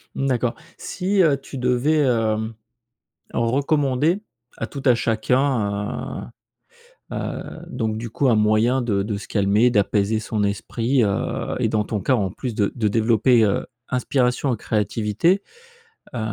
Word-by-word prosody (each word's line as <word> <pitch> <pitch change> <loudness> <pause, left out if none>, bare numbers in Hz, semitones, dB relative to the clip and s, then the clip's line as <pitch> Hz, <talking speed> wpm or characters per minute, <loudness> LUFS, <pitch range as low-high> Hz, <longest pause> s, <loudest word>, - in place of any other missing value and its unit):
Mmh, 135 - -1
d'accord. 125 -2 0 0.2
Si, 190 +2 0
heu, 150 -6 +4
tu 135 0 -9
devais, 125 +5 +2
hem, 115 -4 +1 0.8
recommander 140 - +1 0.4
à - - -3
tout 140 - -7
à 125 - +6
chacun, 115 -3 -1 0.8
heu, - - -3
heu, - - -3 0.3
donc, 110 -2 -2
du 115 -1 -6
coup, 135 +3 +1
un 120 - +5
moyen 110 +5 +3
de 100 -5 0
de 105 0 -3
se 100 - -8
calmer, 105 +4 +3
d'apaiser 105 0 +1
son 110 -1 -2
esprit, 115 +6 0
heu 100 -2 -2
et - - +1
dans 105 -1 0
ton 105 0 -3
cas, 130 +8 +2
en 100 -6 0
plus, 120 +5 -5
de 100 -1 0
de 110 -4 +1
développer, 115 +2 +3
heu, 100 - 0 0.2
inspiration 125 0 +1
et - - -4
créativité. 110 - 0 0.7
Heu, - - -2
115 Hz, 150 wpm, -22 LUFS, 105-130 Hz, 0.8 s, à